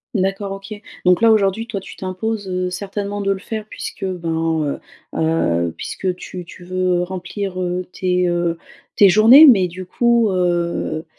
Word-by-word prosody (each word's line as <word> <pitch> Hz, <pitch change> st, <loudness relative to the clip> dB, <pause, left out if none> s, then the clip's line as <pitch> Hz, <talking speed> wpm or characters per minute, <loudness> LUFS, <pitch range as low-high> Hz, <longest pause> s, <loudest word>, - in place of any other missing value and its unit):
D'accord 195 Hz, +1 st, -1 dB
OK. 195 Hz, +2 st, -8 dB, 0.3 s
Donc 180 Hz, +3 st, +4 dB
là, 225 Hz, -1 st, +6 dB
aujourd'hui, 215 Hz, +1 st, +1 dB
toi, 215 Hz, -4 st, -4 dB
tu 195 Hz, -, -11 dB
t'imposes 195 Hz, +2 st, -4 dB, 0.2 s
certainement 200 Hz, +2 st, -4 dB
de 195 Hz, 0 st, 0 dB
le 195 Hz, -, 0 dB
faire 215 Hz, +2 st, -6 dB
puisque, -, -, -7 dB
ben, 165 Hz, -4 st, -2 dB, 0.3 s
heu -, -, -4 dB
heu, 85 Hz, -, +1 dB
puisque 185 Hz, -2 st, -3 dB
tu 180 Hz, 0 st, -8 dB
tu 175 Hz, -, -13 dB
veux 180 Hz, 0 st, 0 dB
remplir, 185 Hz, +1 st, -5 dB
heu, 180 Hz, 0 st, -2 dB
tes 180 Hz, -1 st, 0 dB
heu, 175 Hz, -1 st, 0 dB, 0.4 s
tes 205 Hz, -, +7 dB
journées. 225 Hz, -, +8 dB
Mais 200 Hz, -10 st, +6 dB
du 185 Hz, +2 st, -8 dB
coup, 235 Hz, +2 st, +2 dB
heu 175 Hz, -2 st, -1 dB
185 Hz, 160 wpm, -19 LUFS, 175-200 Hz, 0.4 s, journées